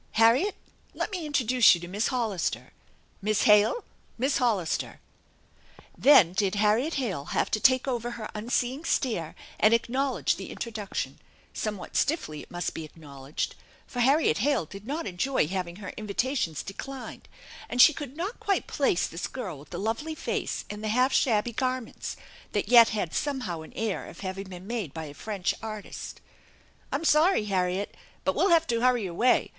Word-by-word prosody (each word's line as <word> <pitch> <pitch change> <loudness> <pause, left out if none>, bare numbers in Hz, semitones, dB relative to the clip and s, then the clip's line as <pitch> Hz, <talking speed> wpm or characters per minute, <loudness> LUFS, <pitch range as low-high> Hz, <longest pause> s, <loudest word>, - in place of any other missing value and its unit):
Harriet, 235 - +4 0.4
let - - -2
me 355 -5 -3
introduce 255 -7 +5
you - - -6
to 175 - -8
Miss 205 +5 -1
Hollister. 225 -8 -2 0.5
Miss 215 +1 +1
Hale, 210 - +5 0.3
Miss 265 +4 +1
Hollister! 215 -10 0 0.5
" - - -30 0.2
Then 225 - +6
did 195 +1 +1
Harriet 215 +9 +2
Hale 195 - -2
have - - -1
to 215 - +1
take 255 +4 +4
over 240 -2 -1
her 220 - -5
unseeing 245 +6 -1
stare 220 - -1 0.2
and 215 +2 +6
acknowledge 260 +4 0
the - - -7
introduction; 215 -4 -5 0.3
somewhat 210 -4 -4
stiffly, 275 - 0
it - - -14
imust 175 0 -3
be 160 - -5
acknowledged, 145 -3 -6 0.3
for 245 - -7
Harriet 270 - +3
Hale 270 - +2
did 195 +7 -11
not 315 +4 -3
enjoy 190 - 0
having 180 -1 -3
her 200 0 -8
invitations 215 - -1
declined, 260 +6 -8 0.4
and 245 - -4
she 310 - +9
could 285 -1 -7
not 385 +8 -4
quite 395 -3 0
place 270 -11 +1
this 165 - -4
girl 195 - -6
with 145 - -15
the 175 - -6
lovely 225 - -2
face - - -3
and 210 +1 -7
the - - -1
half 250 +5 +2
shabby 230 -1 +2
garments, 255 0 -3 0.4
that 205 0 -1
yet 235 -2 +8
had 195 -6 -2
somehow 250 - -2
an 160 - -11
air 220 -4 -2
of - - -11
having 190 0 -5
been 180 0 -9
made 210 - -4
by 160 -1 -4
a 145 - -9
French 200 +2 -2
artist. 215 -2 -7 0.4
" - - -32
I'm 295 +4 -1
sorry, 310 - +4
Harriet, 190 0 -1 0.3
but 190 - +1
we'll 370 +6 +2
have 330 -1 +5
to 230 -4 0
hurry 245 -4 +3
away. 190 +8 +2
220 Hz, 170 wpm, -27 LUFS, 190-260 Hz, 0.5 s, she